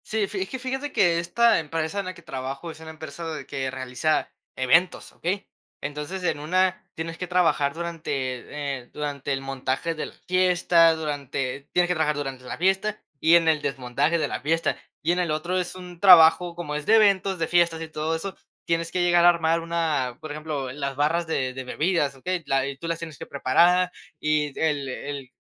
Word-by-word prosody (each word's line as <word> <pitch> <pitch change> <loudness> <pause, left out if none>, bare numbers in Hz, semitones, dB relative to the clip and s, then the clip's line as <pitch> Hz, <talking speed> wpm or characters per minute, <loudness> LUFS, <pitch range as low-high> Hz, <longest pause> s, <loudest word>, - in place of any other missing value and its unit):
Sí, 215 -2 0
fi 195 -1 -4
es 190 - -3
que 260 - -4
fíjate 265 +3 -3
que 170 -3 +3
esta 230 +8 +3
empresa 160 +4 -3
en 200 - -3
la 185 - -4
que 170 - -15
trabajo 135 +4 -5
es 155 - -13
una 160 0 -9
empresa 160 +1 -8
de - - -7
que 135 -1 -3
realiza 130 +4 -1 0.3
eventos, 165 +8 +2
¿okey? 190 +4 -3 0.3
Entonces, 150 +6 -5
en 175 - 0
una 185 +5 +1
tienes 165 0 -5
que 180 - -4
trabajar 170 -5 +2
durante, 170 -1 -5 0.7
eh, 120 - -20
durante 145 -1 -4
el 135 0 -1
montaje 135 +4 -2
de 155 - -4
la - - -13
fiesta, 180 -2 +4
durante 140 -3 -4
tienes 180 0 +3
que 180 - +1
trabajar 155 -3 +1
durante 135 -3 -5
la 125 - -6
fiesta 195 +4 +1 0.2
y 165 +4 +5
en 165 -1 +4
el 155 -2 +3
desmontaje 135 +5 0
de 155 -3 0
la - - -4
fiesta. 165 +3 0 0.3
Y 165 - +2
en 175 - +1
el 175 -3 0
otro 170 +4 -1
es 180 0 -3
un 180 -2 -10
trabajo, 175 -2 +7
como 160 -4 -4
es 150 0 -4
de 225 - +5
eventos, 195 -3 +4
de 165 - 0
fiestas 170 -2 +2
y 165 - -4
todo 160 +1 -2
eso, 190 +3 -5 0.3
tienes 165 0 -1
que 180 - 0
llegar 175 -1 +4
a - - +10
armar 165 -1 +2
una, 160 -7 -1
por 155 -1 -7
ejemplo, 150 -3 -4
las 140 0 -4
barras 160 +4 +1
de 130 -5 -1
de 130 0 -6
bebidas, 150 +1 0
¿okey? 180 +6 -3
La 135 -1 +2
eh, 140 -1 -5
tú 165 - -4
las 165 0 -1
tienes 160 -4 -7
que - - -6
preparar 175 +7 +3 0.3
y 150 -2 0
el 150 -3 0
el 140 0 -6
160 Hz, 210 wpm, -25 LUFS, 145-175 Hz, 0.7 s, a